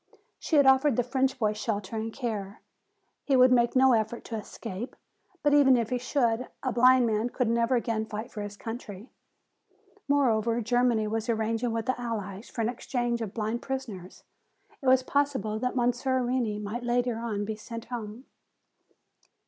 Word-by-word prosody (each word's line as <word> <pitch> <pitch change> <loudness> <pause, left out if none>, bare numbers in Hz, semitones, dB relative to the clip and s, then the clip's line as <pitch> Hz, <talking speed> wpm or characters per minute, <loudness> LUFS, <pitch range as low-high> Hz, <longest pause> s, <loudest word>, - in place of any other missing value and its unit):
She 320 - -1
had 285 -2 +6
offered 265 0 +5
the 245 - +2
French 260 +2 0
boy 215 -4 +1
shelter 210 -1 -3
and 220 +1 -3
care. 215 -5 -5 0.6
He 275 - +2
would 255 0 +6
make 240 -1 +3
no 260 0 +6
effort 220 +1 -1
to 230 - -6
escape, 220 +1 -6 0.5
but 290 -1 +3
even 270 -3 +6
if 230 -1 -2
he 250 - 0
should, 245 -2 0 0.2
a 260 - 0
blind 250 +1 +5
man 220 +1 0
could 250 0 -1
never 235 +2 +2
again 225 -2 -1
fight 220 +2 -6
for 210 - -6
his 205 0 -7
country. 225 -1 -8 1.0
Moreover, 235 -5 +2
Germany 240 -1 +2
was 225 +1 -3
arranging 225 +1 0
with 225 0 -2
the 255 -1 -1
Allies 210 -3 -5
for 230 - -4
an 225 - +1
exchange 240 -1 -2
of 215 -4 -5
blind 225 +1 -2
prisoners. 225 -9 -6 0.6
It 270 - -4
was 260 0 +5
possible 265 -6 0
that 250 +2 -2
Monsieur 250 +1 +1
Reney 240 -4 -1
might 210 +4 -4
later 240 -1 0
on 215 -3 -2
be 220 +1 -3
sent 230 +1 -8
home." 235 0 -7
235 Hz, 175 wpm, -28 LUFS, 220-255 Hz, 1.0 s, had